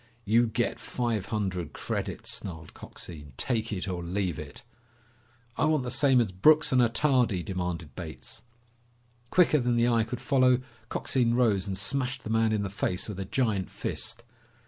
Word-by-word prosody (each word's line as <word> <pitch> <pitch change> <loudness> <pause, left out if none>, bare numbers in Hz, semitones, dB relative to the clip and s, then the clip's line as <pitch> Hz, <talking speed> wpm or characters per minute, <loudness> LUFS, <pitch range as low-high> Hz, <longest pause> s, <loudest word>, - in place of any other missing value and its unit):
"You 115 +3 +4
get 115 +2 -1
five 115 -6 -2
hundred 95 -6 -2
credits," - - -3
snarled 80 -4 -6
Coxine. 75 -5 -9
"Take 115 -3 -1
it 100 -1 -3
or 90 -2 -3
leave 90 -2 -2
it!" - - -9 0.9
"I - - +2
want 155 -3 +2
the 125 - -3
same 135 -1 +4
as 115 -5 +1
Brooks 150 +12 +5
and 130 -1 +5
Attardi," 120 -5 +2
demanded 90 -5 -4
Bates. - - -7 0.9
Quicker 170 -4 +4
than 120 -1 +1
the 120 0 +3
eye 115 -2 +3
could 115 +2 -5
follow, 130 -3 +3 0.3
Coxine 120 -3 +1
rose 105 -6 +2
and 95 -1 -3
smashed 130 +4 -2
the 110 - -4
man 110 0 +3
in 105 -2 0
the 100 - -3
face 95 -2 -1
with 105 -3 -6
a 95 - -3
giant 105 -3 0
fist. - - -4
110 Hz, 170 wpm, -28 LUFS, 95-125 Hz, 0.9 s, Brooks